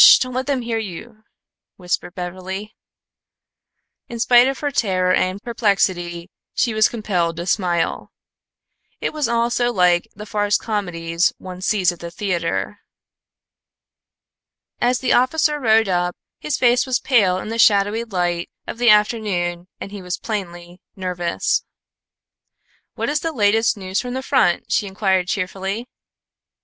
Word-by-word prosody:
Don't 255 -1 -3
let 260 +2 -2
them 270 -4 0
hear 230 -1 -1
you," 215 +3 -8 0.5
whispered 180 -1 -3
Beverly. 185 +3 -6 1.3
In 235 - -7
spite 245 +1 +6
of 270 0 -1
her 290 -1 -2
terror 185 -7 +1
and 185 +1 0
perplexity, 190 -6 -1 0.2
she 235 - +1
was 215 0 +4
compelled 180 -7 -1
to 170 - -4
smile. 180 -2 -1 0.9
It - - -2
was 300 -4 0
all 235 0 +1
so 240 0 +1
like 180 -4 +3
the 210 - -8
farce 205 -1 +1
comedies 175 -6 -1
one 185 -1 -9
sees 185 -2 +2
at 175 - -11
the 170 - -6
theatre. 175 -2 -2 2.0
As 245 0 +1
the 255 - +2
officer 300 +4 +2
rode 225 -4 +3
up, 180 -1 0 0.2
his 300 - -2
face 245 +1 +3
was 255 -1 +1
pale 200 -9 +3
in 185 - -6
the 230 +1 -3
shadowy 205 +1 +4
light 175 -5 -2 0.2
of - - -7
the 240 -1 +4
afternoon 200 -5 +2
and 195 - -7
he 205 -1 -7
was 180 0 -4
plainly 175 -4 -6
nervous. 180 -3 -1 1.3
"What - - -2
is 300 +1 +1
the 330 - -2
latest 220 -3 +2
news 190 0 -2
from 250 0 -5
the 260 - -3
front?" 220 -11 +1
she 205 - +1
inquired 190 -2 0
cheerfully. 195 +4 -3
205 Hz, 145 wpm, -20 LUFS, 180-235 Hz, 2.0 s, spite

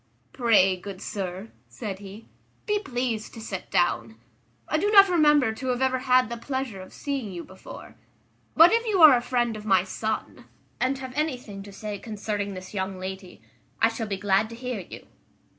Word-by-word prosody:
"Pray, 215 -7 +4
good 190 +1 -8
sir," 195 0 -5 0.2
said 200 -5 -6
he, 200 +2 -11 0.4
"be 420 -1 +1
pleased 245 - -3
to - - -8
sit 195 -4 -6
down. 115 -10 +1 0.5
I 310 - +1
do 410 - +1
not 395 -2 +8
remember 295 -8 +4
to 260 +4 -6
have 250 0 0
ever 260 -1 +1
had 255 -1 +3
the 235 +1 -5
pleasure 260 -5 -4
of 185 - -12
seeing 275 -8 -4
you 175 -2 -6
before; 190 - -12 0.6
but 330 +2 +8
if 460 0 +3
you 390 -6 +3
are 295 -4 +10
a 240 - +1
friend 240 -2 0
of 215 - -8
my 190 -4 +3
son, 215 +3 -4 0.3
and 255 +2 +1
have 260 -1 -7
anything 250 -9 -3
to 200 +1 -11
say 205 0 -6
concerning 205 -2 -4
this 185 +2 -9
young 190 -1 -3
lady, 190 - -8 0.4
I 225 - +5
shall 225 -1 -4
be 200 -1 -2
glad 205 +2 +2
to 230 - -8
hear 250 -2 -4
you. 180 - -10
220 Hz, 190 wpm, -26 LUFS, 195-260 Hz, 0.6 s, are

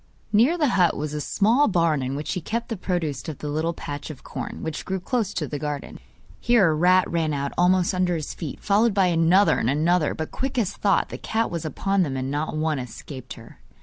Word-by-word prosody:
Near 245 +12 +4
the 300 -5 +2
hut 180 -7 +3
was 150 0 -3
a 150 - -2
small 230 - +3
barn 165 -6 +2
in 130 +1 -3
which 150 +1 -3
he 180 - -3
kept 230 +8 -3
the 225 - -2
produce 165 -8 -3
of 150 - -6
the 150 - -5
little 155 +3 0
patch 145 +1 -6
of 150 -4 -9
corn, - - -6
which 160 -2 -4
grew 190 0 -3
close 215 +1 -1
to 150 - -2
the 145 - -4
garden. 145 -1 -5 0.4
Here 225 -8 +4
a - - +1
rat 180 +4 +4
ran 160 -3 0
out 140 0 -2
almost 180 +1 +3
under 180 -1 +1
his 155 -3 -4
feet, 155 -5 -6
followed 210 +1 +2
by 195 -2 +4
another 170 +5 +4
and 115 - 0
another; 155 +3 +2
but 160 - -5
quick 270 0 -3
as 210 -5 +1
thought 200 -2 +1
the - - -7
cat 225 +1 -1
was 170 -2 -4
upon 195 +5 0
them 140 -6 -1
and 130 +1 -3
not 150 +1 -2
one 155 -2 0
escaped 130 +1 -8
her. 115 -1 -14
165 Hz, 230 wpm, -24 LUFS, 150-195 Hz, 0.4 s, Near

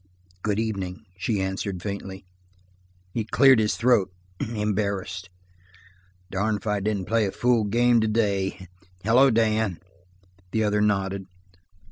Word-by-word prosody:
"Good 105 0 -1
evening," 100 -5 -3
she 105 +2 -1
answered 95 -1 -3
faintly. 100 -2 -6 0.9
He 115 - -1
cleared 130 +3 +5
his 105 -1 +1
throat, 115 -6 +3 0.3
embarrassed. 100 -4 -2 1.0
"Darned 105 +3 0
if - - -14
I 105 -1 0
didn't 100 -2 -1
play 110 +1 +1
a - - -3
fool 120 -1 +2
game 120 +2 +3
today 100 -4 0 0.4
hello, 125 +6 +5
Dan." 110 -5 +1 0.8
The 110 - +2
other 105 0 +1
nodded. 100 -2 0
105 Hz, 120 wpm, -25 LUFS, 95-110 Hz, 1.0 s, cleared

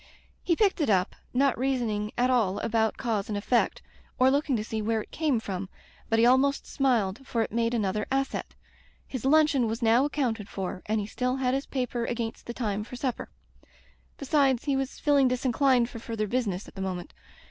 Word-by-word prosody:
He 340 - +1
picked 390 -2 +2
it 290 - +1
up, 190 -1 +2 0.2
not 270 +1 +2
reasoning 235 -6 -1
at 250 +1 +3
all 215 -6 +2
about 220 -1 +1
cause 220 -5 -2
and 205 - -1
effect 235 +4 +1 0.3
or 260 +1 +5
looking 285 -1 +1
to 215 - -1
see 220 0 -3
where 220 0 0
it - - -21
came 300 -7 +1
from, 190 -3 -5 0.4
but 225 - +2
he 230 - +5
almost 265 +3 +3
smiled, 235 -6 +1
for 235 -4 -1
it - - -6
made 230 +1 0
another 210 -1 -1
asset. 270 0 -2 0.5
His 260 -2 -6
luncheon 290 -4 +4
was 225 +2 -3
now 230 +3 +5
accounted 240 -8 -2
for, 185 -1 -4
and 215 +1 +1
he 205 - -2
still 250 +4 -1
had 255 -1 0
his 275 +1 -2
paper 250 -3 -2
against 230 -1 -4
the 235 - -4
time 210 -4 -2
for 245 - -9
supper. 250 -1 -3 0.9
Besides, 275 -3 +2
he 280 -2 0
was 270 0 -2
feeling 285 -3 +4
disinclined 255 0 +2
for 235 - -9
further 225 -2 -3
business 210 -4 -2
at - - -13
the 195 - -7
moment. 185 -2 -4
240 Hz, 195 wpm, -27 LUFS, 215-265 Hz, 0.9 s, or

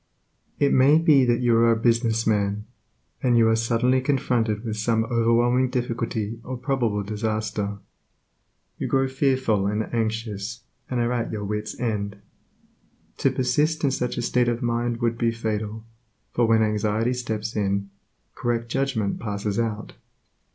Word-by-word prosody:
It 140 -1 +2
may 135 +4 +6
be 150 -5 +5
that 120 0 +2
you 120 -2 +3
are 115 0 +5
a - - +4
business 115 0 +1
man, 105 -1 0 0.6
and 125 -2 +3
you 115 -1 +5
are 110 - +4
suddenly 120 +3 +2
confronted 120 -5 0
with 110 -1 -3
some 110 +1 +1
overwhelming 120 +2 +2
difficulty 115 -3 -2
or 130 0 -5
probable 120 -5 -1
disaster. 105 -1 -2 1.0
You - - -2
grow 135 0 +2
fearful 130 -7 +1
and 105 +3 -2
anxious, 110 -1 -2 0.3
and 125 - -1
are 120 0 +1
at 120 -2 -2
your 105 -2 -4
wit's 105 +1 -4
end. 105 -4 -2 1.0
To - - +3
persist 150 +5 0
in 140 - +3
such 125 -2 -2
a - - -1
state 125 -1 +2
of 120 0 -2
mind 120 0 -1
would 115 0 0
be 115 - +2
fatal, 110 -1 -4 0.5
for 120 -1 +2
when 110 -1 +4
anxiety 110 +2 0
steps 110 -3 -4
in, 100 -1 -1 0.4
correct 120 -1 -2
judgment 130 -6 -1
passes 105 0 -2
out. 110 -2 -3
115 Hz, 150 wpm, -24 LUFS, 110-125 Hz, 1.0 s, may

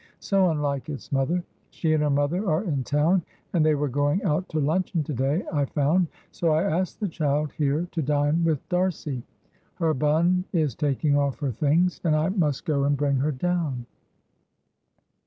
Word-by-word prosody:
So 195 -2 +2
unlike 145 -3 -2
its 145 -3 -7
mother! 145 +6 +1 0.3
She 160 -2 0
and 155 - +2
her 150 - +2
mother 145 +8 +1
are 160 +5 +1
in 145 -9 -1
town, 155 +8 +2 0.3
and 170 -4 +3
they 155 -1 +4
were 145 0 0
going 145 +7 0
out 180 0 0
to 155 - -1
luncheon 165 +3 0
to 150 - -4
day 135 - 0
I 145 -2 +2
found, 155 +6 +1 0.2
so 165 -2 +1
I 155 +3 +2
asked 185 -1 -1
the 210 - -1
child 150 -3 -1
here 150 +3 0
to 165 - -2
dine 145 +3 +1
with 160 -4 0
D'Arcy. 180 -7 -1 0.5
Her 160 -1 +1
bonne 165 +6 +2
is 155 -7 +1
taking 145 +2 +1
off 140 -2 +1
her 140 -3 0
things, 160 - +1
and 160 -3 +2
I 155 +3 +1
must 160 -9 0
go 145 -3 +1
and 145 0 +2
bring 140 -1 +1
her 145 +4 +1
down." 150 -4 -1
155 Hz, 185 wpm, -25 LUFS, 145-170 Hz, 0.5 s, they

